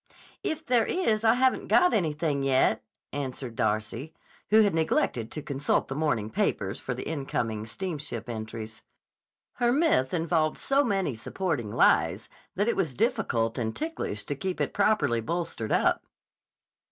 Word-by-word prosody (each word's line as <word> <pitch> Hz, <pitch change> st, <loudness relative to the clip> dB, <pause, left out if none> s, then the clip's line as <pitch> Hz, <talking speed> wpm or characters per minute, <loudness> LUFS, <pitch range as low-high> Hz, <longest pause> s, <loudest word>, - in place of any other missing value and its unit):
"If 315 Hz, 0 st, -3 dB
there 240 Hz, -3 st, +3 dB
is 225 Hz, -12 st, +1 dB
I 225 Hz, +1 st, +5 dB
haven't 260 Hz, +1 st, +2 dB
got 360 Hz, 0 st, +5 dB
anything 155 Hz, -6 st, 0 dB
yet," 135 Hz, -1 st, +2 dB, 0.3 s
answered 130 Hz, -3 st, -4 dB
Darcy, 110 Hz, +7 st, -2 dB, 0.3 s
who 220 Hz, +2 st, +7 dB
had 205 Hz, -2 st, +3 dB
neglected 140 Hz, -7 st, 0 dB
to 150 Hz, -, -5 dB
consult 140 Hz, -1 st, 0 dB
the 135 Hz, -, -3 dB
morning 120 Hz, -9 st, 0 dB
papers -, -, 0 dB
for -, -, -4 dB
the -, -, -6 dB
incoming 115 Hz, -8 st, -2 dB
steamship 150 Hz, -, -5 dB
entries. 110 Hz, -1 st, -6 dB, 0.8 s
Her 240 Hz, -1 st, +3 dB
myth 270 Hz, -, +3 dB
involved 160 Hz, -2 st, +1 dB
so 275 Hz, +1 st, +2 dB
many 195 Hz, -, 0 dB
supporting 120 Hz, -, -3 dB
lies, -, -, +3 dB, 0.3 s
that 205 Hz, +3 st, +1 dB
it 235 Hz, -, +2 dB
was 165 Hz, -10 st, -1 dB
difficult 115 Hz, 0 st, 0 dB
and 110 Hz, -2 st, -2 dB
ticklish 315 Hz, -, -4 dB
to 145 Hz, -, -3 dB
keep 185 Hz, +5 st, -3 dB
it -, -, -1 dB
properly 195 Hz, -, +2 dB
bolstered 165 Hz, -6 st, -3 dB
up. -, -, +3 dB
150 Hz, 150 wpm, -27 LUFS, -, 0.8 s, who